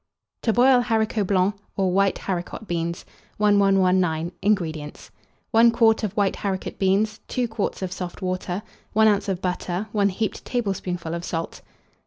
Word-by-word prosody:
TO 225 - +2
BOIL 250 +2 +5
HARICOTS 220 -3 0
BLANCS, 195 +1 +2 0.2
or 190 -2 +2
WHITE 195 +1 +2
HARICOT 185 +3 -4
BEANS. 170 0 -3 0.3
1119. 190 -5 +3
INGREDIENTS. 165 -7 -2 0.4
1 230 +1 +6
quart 225 -1 +3
of 205 -3 -2
white 200 -2 +1
haricot 190 -2 -4
beans, 205 +3 +1
2 250 -2 -1
quarts 220 -3 -3
of 185 - -3
soft 180 -1 -6
water, 185 +1 -3 0.3
1 220 +1 +5
oz. 205 -1 +2
of 185 -1 -3
butter, 180 +2 -2
1 205 -2 +2
heaped 215 +3 -3
tablespoonful 185 -8 -3
of 170 0 -4
salt. 165 -2 -4
195 Hz, 150 wpm, -24 LUFS, 180-215 Hz, 0.4 s, 1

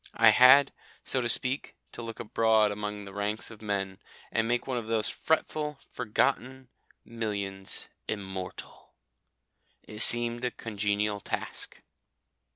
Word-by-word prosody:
I - - +7
had, 130 +2 +7 0.3
so 130 - +1
to 120 - -1
speak, 130 +3 +1 0.2
to - - -8
look 115 -1 -7
abroad 110 -1 +3
among 105 0 -5
the 100 - -10
ranks 105 +3 -2
of 110 - -13
men, 100 -2 -3 0.3
and 115 0 +1
make 120 +1 0
one 130 -2 -2
of 110 - -8
those 110 -1 +1
fretful 150 -2 -1 0.2
forgotten 130 +2 -1 0.4
millions 100 -4 -2 0.2
immortal. 95 -3 -6 0.9
It 105 - -10
seemed 120 +1 +4
a 125 - +1
congenial 105 -2 -1
task. - - -5
110 Hz, 130 wpm, -29 LUFS, 105-120 Hz, 0.9 s, I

